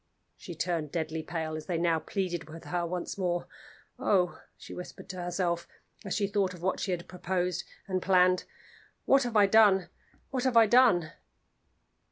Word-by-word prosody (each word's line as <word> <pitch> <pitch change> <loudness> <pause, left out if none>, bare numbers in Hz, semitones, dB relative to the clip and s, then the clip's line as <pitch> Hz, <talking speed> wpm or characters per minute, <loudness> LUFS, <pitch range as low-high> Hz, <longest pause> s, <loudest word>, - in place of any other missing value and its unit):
She 175 - -9
turned 160 -3 -2
deadly 160 -1 -2
pale 160 -1 -4
as 155 -1 -7
they 175 - -1
now 165 -1 +2
pleaded 175 -4 -3
with 165 +1 -10
her 175 -1 -2
once 180 +3 -4
more. 175 -2 -1 0.5
"Oh!" 180 -3 +1 0.2
she - - -10
whispered 180 - -9
to 185 -1 -5
herself, 175 -1 -1 0.4
as 195 - -3
she 205 - +1
thought 195 -2 0
of 175 - -13
what 190 - 0
she - - -3
had 175 -2 -2
proposed 180 0 -2 0.2
and 185 -1 -1
planned, 185 -1 +3 0.6
"what 275 0 +5
have 240 -3 -3
I 205 - +7
done? 200 -2 +5 0.4
what 260 -3 -1
have 255 -3 +3
I 225 - +8
done?" 215 -9 +4
180 Hz, 175 wpm, -29 LUFS, 170-195 Hz, 0.6 s, I